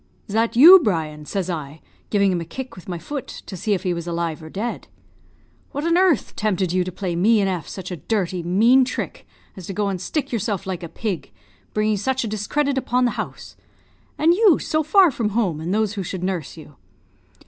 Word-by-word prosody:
'Is 200 - -8
that 225 +1 +1
you, 340 +10 +10
Brian?' 155 - -2
says 195 -3 -2
I, 155 -4 -5 0.3
giving 200 -2 +3
him 175 -2 -1
a - - -3
kick 255 +10 -7
with 185 0 -12
my 175 - -3
foot, 270 - -6 0.2
to 195 - -7
see 205 +4 -1
if 185 - -5
he 180 -2 0
was 170 0 -5
alive 170 -2 -2
or 160 - -10
dead. 220 +8 -4 0.9
'What 285 +3 -3
on 335 0 +3
earth 360 - +2
tempted 190 -4 0
you 185 0 +2
to 185 - -5
play 180 -1 -3
me 215 +6 +4
and 195 - +2
F 180 -5 -3
such 185 -1 -7
a 180 - -4
dirty, 185 +1 -2
mean 220 +10 +4
trick, 250 - -5 0.3
as 185 -3 -9
to 195 - -4
go 205 +1 0
and 185 -3 -3
stick 295 - -3
yourself 205 -4 -2
like 190 -2 -4
a 170 - -7
pig, 175 -5 -4 0.5
bringing 215 0 +1
such 260 +6 -1
a - - -3
discredit 265 +7 -1
upon 250 0 +1
the 240 - +1
house? - - -6 0.6
and 325 +3 +4
you 400 -3 +5
so 310 - 0
far 350 +3 +5
from 230 -4 -1
home 175 -10 0
and 170 +3 -3
those 210 0 +1
who 205 - -4
should 185 0 -5
nurse 180 -5 -3
you?' 150 -3 -13
200 Hz, 220 wpm, -22 LUFS, 175-240 Hz, 0.9 s, you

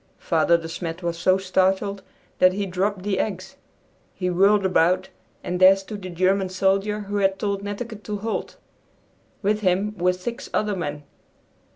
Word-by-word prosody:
Father 170 +1 +2
De 165 -1 -7
Smet 165 +1 -5
was 170 0 -1
so 185 +2 +3
startled 190 +1 0 0.4
that 185 0 +5
he 200 +1 -2
dropped 190 +1 -2
the 195 -2 -1
eggs. 190 -3 -3 0.6
He 180 -1 -1
whirled 195 +3 +4
about, 185 0 +2 0.3
and 180 0 -3
there 185 +1 +8
stood 200 +1 -8
the 185 - -6
German 185 +2 +1
soldier 195 +3 +1
who 205 0 -4
had 195 -1 +2
told 200 0 -2
Netteke 205 +2 -6
to 210 -1 -3
halt. 220 +2 -4 0.9
With 210 +2 +2
him 200 +2 +1
were 180 +1 +3
six 230 +8 -6
other 210 -1 0
men. 150 -4 -4
190 Hz, 165 wpm, -23 LUFS, 180-205 Hz, 0.9 s, there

